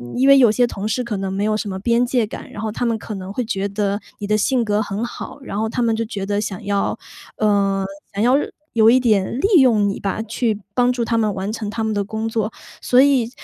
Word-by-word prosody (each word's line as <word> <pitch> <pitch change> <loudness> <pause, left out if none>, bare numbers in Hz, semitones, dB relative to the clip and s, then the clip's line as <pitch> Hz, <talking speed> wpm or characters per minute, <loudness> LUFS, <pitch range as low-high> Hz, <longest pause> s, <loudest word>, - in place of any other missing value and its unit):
因 260 +2 +3
为 275 0 +8
有 240 -5 +6
些 245 +3 +3
同 205 -2 -5
事 250 +4 -1
可 230 -4 -3
能 195 0 -3
没 200 +1 -1
有 215 0 +1
什 215 - -4
么 190 - -4
边 235 +4 +2
界 245 -2 +1
感， - - -9
然 210 - -7
后 220 - -2
他 235 - -2
们 230 -1 +1
可 215 0 -7
能 190 0 -7
会 250 - -1
觉 195 -2 -2
得 200 0 -1 0.2
你 205 - -4
的 215 +1 +2
性 250 +3 +1
格 210 0 +1
很 205 +1 -3
好， 240 - -8
然 210 -6 -5
后 220 0 0
他 245 - -2
们 230 -1 +2
就 225 - -1
觉 200 -3 -5
得 205 +1 -1
想 200 -3 -5
要 200 -1 0 0.4
呃， 200 -2 +1 0.3
想 200 +2 -1
要 250 +3 +4 0.4
有 220 -1 +5
一 255 +2 +6
点 220 -1 +1
利 390 -3 +5
用 215 -5 +4
你 195 - -4
吧， 200 +2 -2
去 225 -1 -1 0.2
帮 245 0 +3
助 245 -1 -1
他 230 - 0
们 215 -2 +1
完 195 +2 -3
成 220 -2 -4
他 225 +1 -3
们 220 -1 -1
的 205 - 0
工 220 +2 -4
作。 220 -1 -1 0.3
所 250 +1 +4
以 265 -5 +3
220 Hz, 280 characters per minute, -20 LUFS, 205-235 Hz, 0.4 s, 为